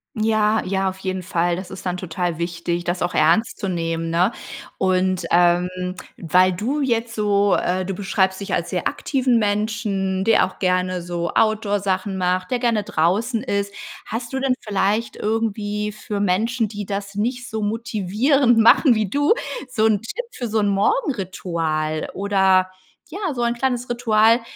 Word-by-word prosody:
Ja, 215 0 +2
ja, 190 0 0
auf 190 0 -9
jeden 185 -1 -3
Fall. 175 0 0
Das 185 0 -7
ist 190 -1 -7
dann 180 - -1
total 175 -1 -3
wichtig, 170 0 -3
das 175 +1 -2
auch 175 - -1
ernst 215 +10 +3
zu 195 - -3
nehmen, 165 -2 -2
ne? 180 +6 +2 0.5
Und, 185 -1 +1
ähm, 175 0 +4 0.5
weil 180 +3 +3
du 260 +11 -2
jetzt 230 -3 -1
so 205 -1 +2
äh, 185 +1 0
du 195 +1 -4
beschreibst 190 -1 0
dich 200 - -5
als - - -1
sehr - - -1
aktiven 255 -4 +1
Menschen, 205 -2 -1
der 225 -2 +4
auch 185 - -11
gerne 185 -1 0
so 170 0 -3
Outdoor-Sachen 205 -3 +1
macht, 185 +1 -1
der 250 - +1
gerne 230 -4 +1
draußen 210 +9 0
ist. 200 -4 -2 0.3
Hast 235 +2 -5
du 265 - -1
denn 265 -1 +1
vielleicht 210 +2 0
irgendwie 210 -1 -2
für 210 0 -5
Menschen, 220 +4 +1
die 205 0 -6
das 200 0 -5
nicht 240 +3 -2
so 220 -1 -3
motivierend 225 +4 +1
machen 235 +3 +6
wie 215 -3 0
du 290 - +3 0.3
so 240 -4 -1
'n 210 -3 +2
Tipp - - -5
für 245 - -5
so 220 0 0
'n 205 - +2
Morgenritual, 180 - -1
oder 190 -2 +2 0.4
ja, 370 -3 -3
so 240 - -3
ein 235 0 +1
kleines 245 -1 -1
Ritual, 230 -1 +3
200 Hz, 165 wpm, -21 LUFS, 185-225 Hz, 0.5 s, machen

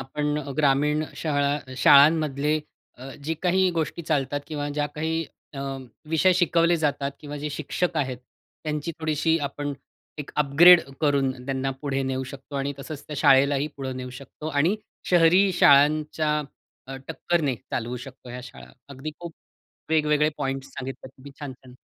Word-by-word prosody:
आपण 150 +3 -2
अ, 145 -2 -6
ग्रामीण 150 +1 +2
शाळा 145 -3 -1
शाळांमधले 150 +2 +5 0.4
अ, 135 +2 -8
जी 160 +2 -1
काही 185 +1 +3
गोष्टी 165 0 -3
चालतात 145 -3 -1
किंवा 145 -2 -4
ज्या 145 0 -1
काही 160 +1 -1 0.3
अ, - - -6 0.5
विषय 160 +4 +4
शिकवले 170 -1 +3
जातात 145 -3 -1
किंवा 145 0 -7
जे 150 +1 -4
शिक्षक 155 +4 -2
आहेत 130 -3 -1 0.5
त्यांची 150 +2 -3
थोडीशी 160 +1 +1
आपण 145 0 -3 0.5
एक 150 - -6
अपग्रेड 160 +5 +7 0.2
करून 140 -3 +2
त्यांना 135 0 -2
पुढे 135 -1 -1
नेऊ 130 0 -2
शकतो 140 +1 -9
आणि 140 +1 -1
तसंच 145 +1 -8
त्या 150 - -6
शाळेलाही 140 +1 +4
पुढे 135 -1 -4
नेऊ 125 0 -6
शकतो 140 +4 -10
आणि 160 +8 +2 0.3
शहरी 180 +3 +5
शाळांच्या 150 0 +4 0.5
अ, 135 0 -6
टक्करने 160 -4 0
चालवू 120 +3 -4
शकतो 130 0 -11
ह्या 125 +1 -6
शाळा. 125 +1 -12 0.2
अगदी 140 +2 -6
खूप 170 -1 -8 0.6
वेगवेगळे 150 -1 +3
पॉइंट्स 135 -1 -3
सांगितले 130 0 -7
तुम्ही 135 +1 -14
छान, 145 -2 -5
छान. 130 -1 -17
145 Hz, 150 wpm, -25 LUFS, 135-155 Hz, 0.6 s, अपग्रेड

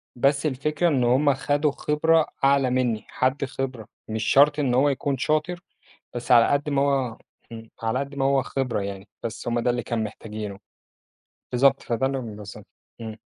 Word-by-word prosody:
بس 140 +4 +2
الفكرة 150 +4 0
إن 135 -6 +2
هُم 135 +4 +3
خدوا 145 +2 0
خِبرة 155 +3 +2 0.2
أعلى 135 -1 +4
مني، 125 -3 0
حد 130 +2 0
خِبرة 130 -5 -5 0.2
مش 110 0 -3
شرط 145 +5 +4
إن 135 -4 +1
هو 135 +4 +4
يكون 140 0 -1
شاطر، 155 +6 0 0.6
بس 120 +1 -1
على 115 -1 +7
قد 145 +1 0
ما 140 -1 +2
هو 135 -5 0 0.3
إمم، 115 -1 -10
على 115 +2 0
قد 140 +1 -4
ما 135 -1 -1
هو 135 0 +3
خِبرة 130 -3 -2
يعني 100 0 -6
بس 115 +1 -5
هُم 120 0 0
ده 125 - +1
اللي 120 0 -1
كان 115 -2 -2
محتاجينه 105 -1 -7 0.9
بالضبط، 135 +2 +3
فده 120 +3 -1
اللي 135 0 -1
هُم 115 -4 -7
بالضبط 105 -1 -10 0.3
إمم. 110 -1 -6
130 Hz, 180 wpm, -24 LUFS, 115-140 Hz, 0.9 s, على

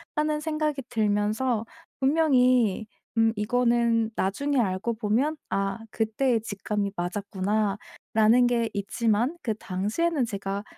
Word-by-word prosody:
하는 300 0 0
생각이 305 -2 -1
들면서 215 +1 0 0.3
분명히 255 -7 +3 0.3
음 225 0 +4
이거는 235 +1 +2
나중에 275 +9 0
알고 200 +1 0
보면 240 +8 0
'아 195 +2 -1
그때의 225 +2 0
직감이 205 -1 -3
맞았구나.'라는 205 +5 0
게 235 -2 +1
있지만 225 - 0
그 225 - 0
당시에는 225 - -1
제가 200 -2 -4
225 Hz, 255 characters per minute, -26 LUFS, 205-255 Hz, 0.3 s, 음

